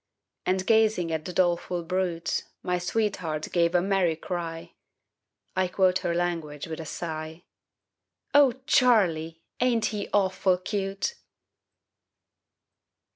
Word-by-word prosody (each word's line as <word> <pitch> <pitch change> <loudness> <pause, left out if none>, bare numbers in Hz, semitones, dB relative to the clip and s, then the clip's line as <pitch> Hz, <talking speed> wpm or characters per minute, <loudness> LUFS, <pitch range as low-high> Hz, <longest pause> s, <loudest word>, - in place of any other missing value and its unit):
And 185 0 +1
gazing 220 -6 +3
at 160 -1 -2
the - - -4
doleful 175 -1 +1
brute 175 -1 -1 0.2
My 180 0 0
sweetheart 180 -5 -1
gave 170 0 +2
a 175 - +4
merry 190 -4 +2
cry 165 -1 -5 0.8
I 185 0 +2
quote 185 0 +2
her 170 - -1
language 165 -4 -2
with 160 -1 -6
a 160 - -6
sigh 160 +1 -5 0.9
"O 285 -4 +6
Charlie, 170 - +3 0.2
ain't 240 -3 +2
he 205 -1 -4
awful 190 -2 +2
cute?" 195 - -2
180 Hz, 115 wpm, -27 LUFS, 165-195 Hz, 0.9 s, O